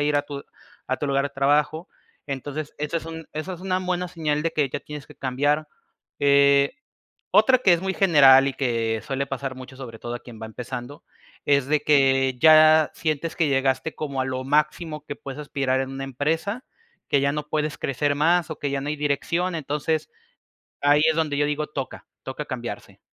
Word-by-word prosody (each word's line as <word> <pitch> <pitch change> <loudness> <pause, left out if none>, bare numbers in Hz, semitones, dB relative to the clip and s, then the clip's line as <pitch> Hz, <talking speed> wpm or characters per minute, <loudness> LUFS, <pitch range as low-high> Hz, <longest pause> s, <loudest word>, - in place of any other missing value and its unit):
ir 145 0 +2
a 145 - +2
tu 140 -1 -7 0.4
a 130 - -1
tu 145 - -3
lugar 140 0 +1
de 140 - -9
trabajo, 150 +4 +1 0.4
entonces, 145 +2 -5
eso 150 +3 -2
es 165 - -4
un 160 -1 -8
eso 155 +5 -4
es 180 - -8
una 185 0 0
buena 180 -1 -2
señal 150 -3 -1
de 165 - 0
que 150 -3 +1
ya - - -4
tienes 150 -2 -9
que - - -15
cambiar, 145 +4 0 0.5
eh, 140 0 +4 0.6
otra 260 -1 +6
que 200 -7 +4
es 170 - -2
muy 190 0 -1
general 140 -8 +6
y - - -2
que 115 -4 -1
suele 140 -1 -2
pasar 135 -1 -4
mucho, 130 0 -10
sobre 120 -4 -9
todo 120 +1 -5
a 120 - -6
quien 115 -3 -12
va 110 - -5
empezando, 125 +4 -7 0.4
es 140 -2 +3
de 150 +1 +2
que 135 -3 +3
ya 155 0 +7
sientes 160 0 -2
que 160 -3 +2
llegaste 135 +3 0
como 140 -3 -3
a - - +1
lo 130 0 -3
máximo 150 +2 0
que 145 - -6
puedes 140 +2 -8
aspirar 135 -3 -1
en 135 0 -3
una 135 0 -5
empresa, 160 - -2 0.4
que 140 - +3
ya 140 +1 +1
no 150 +1 -2
puedes 150 0 -1
crecer 145 +2 0
más, 165 +3 +2
o 155 - -6
que 145 - -2
ya 140 0 -1
no 135 - -6
hay 150 - -1
dirección, 165 +5 -1
entonces, 150 +1 -2 0.7
ahí 145 +1 +4
es 160 - -1
donde 155 -3 0
yo 145 - +3
digo, 150 +1 -2
toca 135 -3 -6 0.2
toca 135 +3 -5
cambiarse. 120 -4 -7
145 Hz, 200 wpm, -24 LUFS, 135-155 Hz, 0.7 s, ya